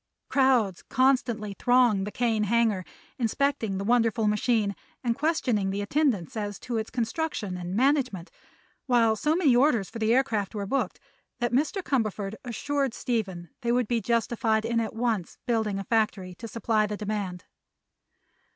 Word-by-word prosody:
Crowds 250 -9 +3
constantly 245 -5 +1
thronged 245 -6 +3
the - - -4
Kane 225 -3 +1
hangar, 220 -3 +2 0.4
inspecting 235 -3 0
the 195 - -3
wonderful 230 0 +2
machine 210 -1 +1 0.3
and 235 -2 +1
questioning 250 -11 0
the 200 +1 -2
attendants 235 - 0
as 205 -2 -3
to 240 -2 -4
its 220 0 -3
construction 235 - -2
and 180 +1 -5
management, 255 - +1 0.6
while 230 -3 +4
so 300 +8 +1
many 305 -9 +4
orders 245 -6 +3
for 230 - -7
the 220 0 +2
aircraft 230 -5 +1
were 200 -1 -2
booked 275 +8 -1 0.4
that 240 -1 -1
Mr. 310 - +1
Cumberford 215 - -1
assured 270 +1 -2
Stephen 190 -9 -3
they 235 - 0
would 245 -2 +2
be 235 0 0
justified 230 0 +1
in 230 0 +1
at 220 -1 -3
once 225 -6 -1
building 220 -4 0
a 195 - -3
factory 205 -4 0
to 230 +6 -8
supply 220 -2 0
the 210 0 -4
demand. 200 -4 -4
225 Hz, 155 wpm, -27 LUFS, 205-250 Hz, 0.6 s, while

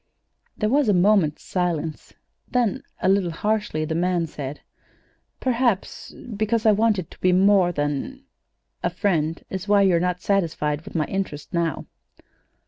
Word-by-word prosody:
There 215 - 0
was 270 +1 +2
a 205 - +4
moment's 180 -5 +3
silence; 165 -4 -2 0.4
then, 240 -6 +1 0.2
a - - +3
little 190 -2 +3
harshly, 205 -3 -1
the 160 - -3
man 175 0 +1
said: 145 -2 -7 0.8
"Perhaps 240 -5 -1 0.2
because 215 +2 0
I 215 - +7
wanted 210 -4 +1
to - - -15
be 185 - +4
more 190 -1 +4
than 145 - -3 0.6
a - - +1
friend 165 -5 -1
is 190 +1 -4
why 205 -1 +5
you're 180 -3 +4
not 180 +1 -1
satisfied 165 -7 0
with - - -11
my 155 -2 +1
interest 190 -6 -4
now." 170 -3 -1
185 Hz, 145 wpm, -23 LUFS, 165-210 Hz, 0.8 s, I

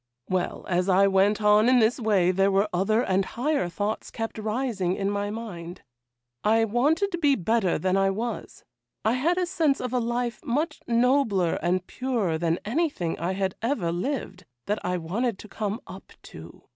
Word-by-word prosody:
'Well, 185 -1 -2
as 180 +1 0
I 190 +1 +5
went 195 +2 +2
on 210 +3 +5
in 255 - +5
this 230 +2 +3
way 200 -6 +3
there 195 +1 +2
were 200 +2 +2
other 215 +6 +2
and 190 -2 +1
higher 260 - -1
thoughts 205 +5 -3
kept 225 -1 -5
rising 215 -4 -1
in 200 0 -1
my 205 0 -2
mind. 185 -6 -7 0.6
I 225 +1 +3
wanted 295 - +1
to 345 - -3
be 290 -4 +4
better 210 -1 +1
than 185 0 0
I 195 0 +3
was; 225 +5 -5 0.4
I 220 - +3
had 315 +8 +1
a 365 - +1
sense 325 -6 +1
of 250 0 -4
a 250 - +2
life 240 0 -2
much 295 +7 -1
nobler 235 -7 +2
and 180 +2 0
purer 225 -12 -1
than 165 0 +1
anything 235 - -1
I 175 +3 -1
had 190 -1 -1
ever 225 -8 0
lived, 185 -2 -4 0.2
that 210 +1 -2
I 180 0 -1
wanted 200 +7 -2
to 215 - -11
come 210 +1 -3
up 185 +1 -12
to. 80 +1 -12
210 Hz, 185 wpm, -26 LUFS, 185-245 Hz, 0.6 s, I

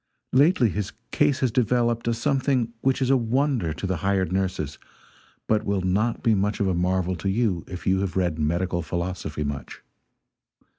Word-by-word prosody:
Lately 135 -2 +4
his 105 +1 -3 0.2
case 150 0 +2
has 130 -3 +2
developed 120 -1 +1
a 120 - +2
something 130 -2 0
which 135 0 +1
is 130 - +2
a - - +6
wonder 125 - 0
to 80 - -5
the 95 -2 -1
hired 95 -2 0
nurses, 90 -6 -2 0.7
but 110 -1 +2
which - - -10
will 100 -1 +1
not 100 +6 0
be 115 - +4
much 105 +1 0
of 100 - +1
a 95 - +1
marvel 90 +1 0
to 90 +4 -2
you 95 -5 0
if 90 -1 -8
you 95 0 +3
have 95 -2 -2
read 85 -4 0
medical 85 +3 0
philosophy 85 -2 -3
much. 70 -1 -6
100 Hz, 185 wpm, -25 LUFS, 90-120 Hz, 0.7 s, a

